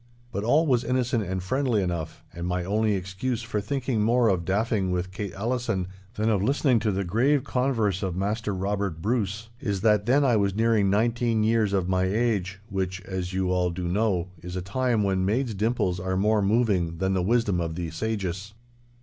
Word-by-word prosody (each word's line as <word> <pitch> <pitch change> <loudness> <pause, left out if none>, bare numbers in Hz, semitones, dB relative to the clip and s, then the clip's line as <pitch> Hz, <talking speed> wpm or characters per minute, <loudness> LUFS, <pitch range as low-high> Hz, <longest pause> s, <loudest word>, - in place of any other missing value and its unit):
But 100 - -3
all 145 +8 +3
was 125 -5 +2
innocent 125 -3 0
and 95 0 -3
friendly 130 +2 +1
enough, 85 -3 -4
and 85 +1 -4
my 90 0 -1
only 105 +2 +1
excuse 100 +6 -3
for 110 -3 -2
thinking 125 0 -1
more 115 +2 +3
of 90 -4 0
daffing 100 0 0
with 90 +1 -2
Kate 100 -1 -5
Allison 110 -4 -1 0.3
than 110 +1 0
of 105 -4 +2
listening 130 +1 +2
to 110 -1 0
the 100 0 -1
grave 125 +9 +2
converse 115 -7 0
of 95 -4 -2
Maister 105 +3 -1
Robert 100 -2 -2
Bruce, 110 +2 -1
is 100 -8 -2
that 105 -1 +3
then 140 +3 +4
I 120 -4 +4
was 100 -2 +1
nearing 110 -3 +3
nineteen 115 +2 +1
years 110 -2 +2
of 95 -3 0
my 95 0 +1
age—which, 95 -3 -1
as 95 -1 -4
you 95 -1 0
all 90 -1 +2
do 90 0 -4
know, 95 -2 0
is 90 +1 -7
a 90 - -2
time 115 +3 0
when 95 -1 +1
maids' 115 +5 0
dimples 100 -4 0
are 95 +1 -2
more 105 +2 +3
moving 100 -6 +1
than 95 +2 0
the 95 - +1
wisdom 100 -2 +1
of 80 -1 -3
the 85 -2 -4
sages. 100 +1 -3
100 Hz, 190 wpm, -26 LUFS, 95-115 Hz, 0.3 s, then